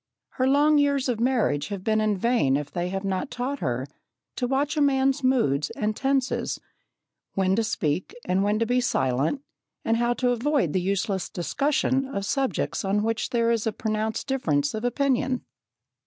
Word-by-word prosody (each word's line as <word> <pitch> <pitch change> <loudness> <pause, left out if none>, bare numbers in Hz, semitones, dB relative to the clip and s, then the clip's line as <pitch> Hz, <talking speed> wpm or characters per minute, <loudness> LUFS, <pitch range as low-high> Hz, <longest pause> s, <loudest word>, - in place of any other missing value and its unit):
Her 255 - 0
long 290 +2 +4
years 280 -2 +2
of 240 -3 -1
marriage 230 - +1
have 200 -2 -5
been 215 +1 +2
in 215 -2 +1
vain 205 - +2
if 145 -1 -5
they 175 0 -2
have 195 +1 -3
not 195 +8 -2
taught 260 +3 -3
her 125 +1 -2 0.5
to 245 - -1
watch 275 +4 0
a 300 - +1
man's 270 0 +2
moods 150 - +2
and 215 0 -1
tenses; 270 +1 0 0.8
when 190 0 +2
to 225 - +1
speak 175 -6 -2
and 185 +2 +1
when 205 +1 +1
to 230 - +1
be 250 +2 +2
silent, 140 - 0 0.4
and 225 0 +2
how 240 +1 +1
to 250 +1 +1
avoid 245 - +1
useless 195 +1 -1
discussion 270 - 0
of 200 -7 -4
subjects 270 0 -1
on 200 +2 +1
which 225 0 -1
there 235 -1 +2
is 230 -1 0
a - - +1
pronounced 215 0 -2
difference 155 - 0
of 220 +1 -4
opinion. 260 0 0
230 Hz, 175 wpm, -25 LUFS, 195-265 Hz, 0.8 s, long